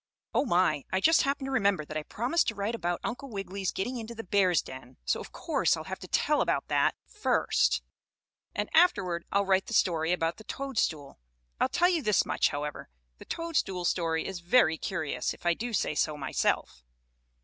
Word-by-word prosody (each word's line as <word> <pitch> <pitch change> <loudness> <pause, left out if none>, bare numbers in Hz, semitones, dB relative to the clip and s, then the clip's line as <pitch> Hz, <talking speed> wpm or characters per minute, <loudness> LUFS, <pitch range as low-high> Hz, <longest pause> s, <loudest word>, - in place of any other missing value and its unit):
Oh, - - +2
my! 175 - +2
I 190 - +2
just 325 +10 +5
happened 275 0 -1
to 270 - -4
remember 200 - +2
that 155 - -8
I 155 - -1
promised 250 - 0
to 225 - -1
write 205 +3 -2
about 175 -6 -2
Uncle 260 +4 -4
Wiggily 195 -2 -5
getting 215 +8 -2
into 230 0 -7
the 225 - -6
bear's 185 -3 +3
den, 130 -1 -11
so 65 - +1
of - - -9
course - - +1
I'll - - -6
have - - -6
to - - -9
tell - - +2
about - - 0
that - - +2
first, - - +1 0.7
and 210 +1 -1
afterward 185 - +3
I'll 200 0 +2
write 190 0 +2
the 230 - -3
story 165 -4 +2
about 165 -2 0
the 220 - -12
toadstool. 205 - -3 0.4
I'll - - +2
tell 355 +1 +3
you 345 -3 +1
this 210 -6 +2
much, - - +2
however, 145 0 -5 0.3
the - - -11
toadstool 280 - -2
story 165 -2 0
is 190 -2 -4
very 175 -3 +3
curious, 155 -9 -2
if - - -20
I 175 - +4
do 235 +7 -4
say 215 - 0
so 150 0 0
myself. 100 - -1
190 Hz, 195 wpm, -29 LUFS, 165-235 Hz, 0.7 s, just